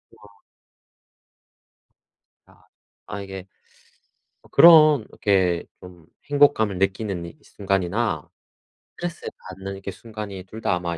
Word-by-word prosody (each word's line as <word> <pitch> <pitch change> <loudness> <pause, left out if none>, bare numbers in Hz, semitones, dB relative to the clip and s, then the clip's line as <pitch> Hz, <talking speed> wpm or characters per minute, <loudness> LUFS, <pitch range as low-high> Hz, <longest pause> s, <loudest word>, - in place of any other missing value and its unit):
아. 100 -1 -20 2.1
아. - - -24 0.4
아 100 -1 -6
이게 95 -1 -8 0.9
어 - - -21
그런 155 -5 +7
이렇게 95 -4 +1
좀 90 -2 -14 0.2
행복감을 140 -9 +3
느끼는 95 -2 -2
이 85 - -11
순간이나 100 +3 -2 0.7
스트레스를 175 -1 -5 0.2
받는 95 +1 -7
이렇게 95 0 -7
순간이 105 -3 -8
둘 110 +4 -11
다 90 - +1
아마 85 -1 -4
100 Hz, 225 characters per minute, -23 LUFS, 95-110 Hz, 2.1 s, 그런